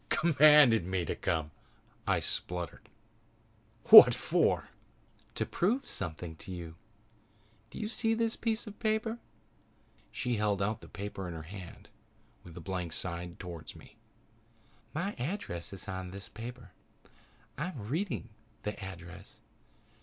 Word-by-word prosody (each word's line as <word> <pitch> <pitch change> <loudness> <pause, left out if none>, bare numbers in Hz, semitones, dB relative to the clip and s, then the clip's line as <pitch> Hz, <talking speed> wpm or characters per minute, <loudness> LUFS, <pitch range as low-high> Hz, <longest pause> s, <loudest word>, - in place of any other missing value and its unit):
"Commanded 150 - +6
me 90 -1 -1
to - - -2
come!" 80 -2 -1 0.6
I - - +2
spluttered. 90 -1 -4 1.0
"What - - +12
for?" - - +1 0.7
"To - - 0
prove 240 +10 0
something 80 -2 -4
to 95 - -9
you. 85 -3 -6 1.0
Do - - -11
you 215 - -3
see 225 0 +1
this 230 0 0
piece 225 0 -1
of 210 -2 -10
paper?" 220 +1 0 0.9
She 125 -3 -1
held 105 -2 +1
out 105 +2 -1
the - - -12
paper 100 -2 -6
in 85 - -6
her 80 - -7
hand 90 +1 -10 0.6
with 85 -2 -12
the 90 - -8
blank 90 -3 -4
side 85 0 -5
toward 85 -4 -8
me. - - -15 1.0
"My 190 +7 -2
address 125 - -4
is 95 +1 -9
on 95 -1 -5
this 100 +2 -9
paper. 115 -2 -9 0.8
I 150 +5 -3
am 125 - -7
reading 170 - -2 0.3
the 105 -2 -4
address. 90 -2 -10
100 Hz, 135 wpm, -31 LUFS, -, 1.0 s, What